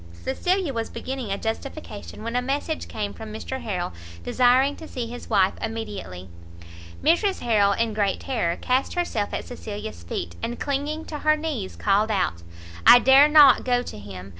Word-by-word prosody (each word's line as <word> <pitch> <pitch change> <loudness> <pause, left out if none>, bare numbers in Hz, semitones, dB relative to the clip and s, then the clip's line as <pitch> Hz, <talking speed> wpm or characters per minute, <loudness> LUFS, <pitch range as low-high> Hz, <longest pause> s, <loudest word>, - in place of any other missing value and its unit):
Cecilia 340 - -1
was 230 -1 -3
beginning 260 -4 -5
a 195 - -1
justification, 225 -1 -6
when 230 +1 -4
a 250 - +2
message 285 +5 -2
came 205 -2 -4
from 220 -1 -9
Mr 260 +4 -5
Harrel, 180 - -3 0.3
desiring 255 - +3
to 320 - -10
see 250 -5 -4
his 240 +1 -9
wife 195 -4 +3
immediately. 210 - -5 0.8
Mrs 375 +5 +2
Harrel, 205 -4 +3
in 230 +1 -1
great 205 -2 0
terror, 200 -11 -1
cast 255 +6 0
herself 235 -13 -1
at - - -4
Cecilia's 205 - -7
feet, 85 0 -5
and 240 - -4
clinging 290 +3 -2
to 300 - -6
her 305 +1 +3
knees, 295 -12 -4
called 205 +2 +2
out 185 - 0 0.4
"I 245 - +10
dare 265 +3 +7
not 295 -4 +7
go 245 -1 +1
to 105 - -8
him! 95 -2 -9
235 Hz, 170 wpm, -24 LUFS, 205-275 Hz, 0.8 s, I